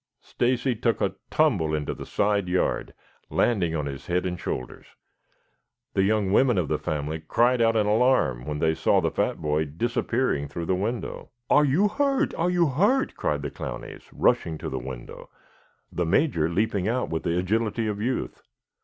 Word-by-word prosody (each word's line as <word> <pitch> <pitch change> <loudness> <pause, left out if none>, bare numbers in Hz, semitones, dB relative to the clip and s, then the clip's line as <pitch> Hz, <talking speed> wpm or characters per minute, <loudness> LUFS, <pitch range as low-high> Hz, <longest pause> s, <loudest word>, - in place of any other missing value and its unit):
Stacy 125 +1 0
took 115 +1 0
a - - 0 0.2
tumble 80 -1 +2
into 75 -1 -2
the - - -9
side 100 -3 +1
yard, 90 0 -1 0.3
landing 90 -9 +1
on 75 -2 -1
his 70 -1 -7
head 90 +1 0
and 90 -2 -3
shoulders. 65 - -5 1.1
The 95 - +2
young 100 -1 +1
women 120 +1 +4
of 85 -6 0
the - - 0
family 75 +1 -3
cried 120 +10 +2
out 115 0 +3
in 110 -2 +3
alarm 105 - +2
when 75 -1 -2
they 80 +1 +2
saw - - +2
the - - 0
fat - - 0
boy 75 +1 0
disappearing 115 - -1
through 85 +3 -5
the 95 - +1
window. 110 +6 -3 0.2
"Are 150 0 +6
you 160 +10 +3
hurt? 275 +4 +1
Are 170 +2 0
you 175 -1 +3
hurt?" 205 - +2
cried 75 -1 -1
the 70 - -4
Clowneys, - - -7
rushing 80 -1 +1
to - - -5
the - - -3
window, 65 -1 -9 0.6
the 90 -2 -1
Major 85 - +2
leaping 100 +1 0
out 125 +3 -1
with 80 - -1
the 85 - -1
agility 110 +4 0
of 105 -1 -2
youth. 125 +3 -2
100 Hz, 180 wpm, -25 LUFS, 80-120 Hz, 1.1 s, Are